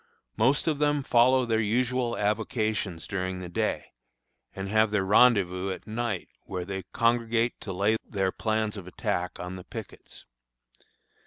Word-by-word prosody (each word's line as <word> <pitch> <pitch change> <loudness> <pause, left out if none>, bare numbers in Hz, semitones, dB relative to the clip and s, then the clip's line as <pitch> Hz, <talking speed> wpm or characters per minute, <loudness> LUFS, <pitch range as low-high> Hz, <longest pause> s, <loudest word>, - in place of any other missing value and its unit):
Most 130 +6 +3
of 155 -3 0
them 145 -1 +2
follow 130 +1 +4
their 115 -2 +1
usual 120 +2 0
avocations 105 -4 -1
daring 95 -1 -3
the 90 -1 -7
day, 85 - -2 0.6
and 95 0 -4
have 110 +2 +3
their 105 -2 0
rendezvous 95 -4 +4
at 95 - -5
night, 110 -4 -3 0.2
where 90 -2 -4
they 95 -1 -5
congregate 115 0 +1
to 100 - -5
lay 100 +4 +2
their 95 -3 -1
plans 110 0 -1
of 95 -3 -8
attack 90 0 -3
on 90 +1 -5
the 90 - -9
pickets. - - -10
110 Hz, 150 wpm, -27 LUFS, 95-120 Hz, 0.6 s, follow